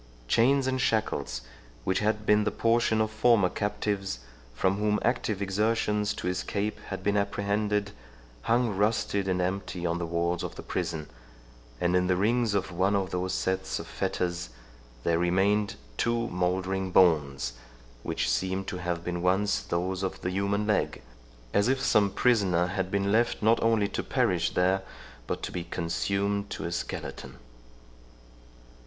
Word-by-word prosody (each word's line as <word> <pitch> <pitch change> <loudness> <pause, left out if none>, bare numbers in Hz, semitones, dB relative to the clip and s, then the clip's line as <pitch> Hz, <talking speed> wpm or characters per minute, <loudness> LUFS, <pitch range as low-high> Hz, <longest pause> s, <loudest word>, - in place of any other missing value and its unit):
Chains 130 - +4
and 130 -1 0
shackles, 105 - 0 0.4
which 95 +6 +1
had 105 0 0
been 105 0 +4
the 110 - +1
portion 115 -1 +2
of 110 0 0
former 110 -3 +4
captives, 100 - -2 0.4
from 95 +9 +1
whom 105 0 +2
active 110 -4 0
exertions 105 +1 +1
to - - -4
escape 100 +3 -2
had 95 - -5
been 100 0 +1
apprehended, 100 0 0 0.5
hung 115 - +1
rusted 105 -1 +1
and 90 -1 +1
empty 90 -1 -2
on 85 0 0
the 85 - -2
walls 85 +1 0
of - - -5
the - - -8
prison, 80 -4 -3 0.7
and 90 +1 +2
in 90 0 +3
the 90 - +3
rings 110 +3 +2
of 95 -1 -1
one 95 +4 +1
of 95 -2 -1
those 90 +1 -1
sets 95 0 -1
of - - -6
fetters 85 -6 -2 0.5
there 85 0 +2
remained 100 +4 +2 0.2
two 115 0 +1
mouldering 95 +1 -1
bones, 75 -9 +3 0.5
which - - -1
seemed 95 +1 0
to 95 - -4
have 90 -2 -3
been 85 0 -3
once 95 +2 +2
those 90 +2 -2
of 95 - -3
the 90 - -2
human 100 +2 0
leg, 105 -1 0 0.5
as 100 +2 +3
if 135 +1 +2
some 105 -5 +3
prisoner 100 -7 +2
had 95 0 -2
been 100 0 0
left 115 0 +2
not 110 +2 +4
only 110 -3 +3
to - - -3
perish 85 -2 0
there, 95 +2 +3 0.5
but - - -3
to - - -3
be 90 - -3
consumed 100 +4 -1
to - - -5
a 85 - -3
skeleton. 85 - -5
100 Hz, 160 wpm, -28 LUFS, 90-105 Hz, 0.7 s, Chains